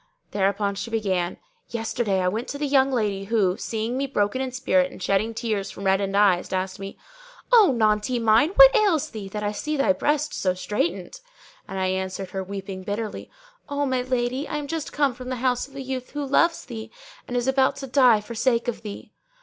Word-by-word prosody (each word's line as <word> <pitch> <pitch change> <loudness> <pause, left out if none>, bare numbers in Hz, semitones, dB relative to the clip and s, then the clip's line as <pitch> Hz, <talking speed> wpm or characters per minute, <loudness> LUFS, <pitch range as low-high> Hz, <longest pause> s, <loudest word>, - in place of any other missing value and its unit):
Thereupon 200 0 0
she 200 +4 -5
began, 190 -6 -1 0.3
"Yesterday 225 -4 -1
I 180 - +1
went 220 +6 -2
to 285 - -5
the 295 - -2
young 270 -1 +3
lady 205 -5 -1
who, 195 -4 +2
seeing 225 +2 -3
me 275 +1 -1
broken 210 -1 0
in 260 -1 -3
spirit 270 +2 +1
and - - -11
shedding 200 +4 0
tears 215 -4 -2
from 200 - -9
reddened 195 +1 +1
eyes, 190 -4 +3
asked 185 0 -2
me, 195 0 -7 0.6
'O 435 - +7
naunty[FN#607] 215 +2 +1
mine, 225 +7 +5
what - - +9
ails 400 -9 +2
thee, 210 -3 -6
that 210 +1 -5
I 205 - 0
see 305 +8 -3
thy 280 +1 +3
breast 295 +1 0
so 185 -1 0
straitened?'; 210 - -3 0.5
and 195 - -6
I 190 - 0
answered 190 0 -3
her, 190 0 -3
weeping 195 0 -6
bitterly, 205 +2 -4 0.4
'O 285 0 0
my 260 -2 0
lady, 255 +2 -1
I 300 - -3
am 295 - -4
just 320 +1 -4
come 285 -3 +1
from 250 +1 -8
the 255 - -2
house 250 +1 0
of 275 - -18
a 275 - -5
youth 255 -1 -5
who 290 -1 -3
loves 330 +5 +2
thee 220 -3 -7 0.4
and 245 - -5
who - - +2
is 245 +1 -1
about 265 0 +3
to 270 - -6
die 250 -5 +4
for 220 +3 -8
sake 235 +1 +1
of 240 - -3
thee!' 210 -2 -8
230 Hz, 215 wpm, -24 LUFS, 200-265 Hz, 0.6 s, what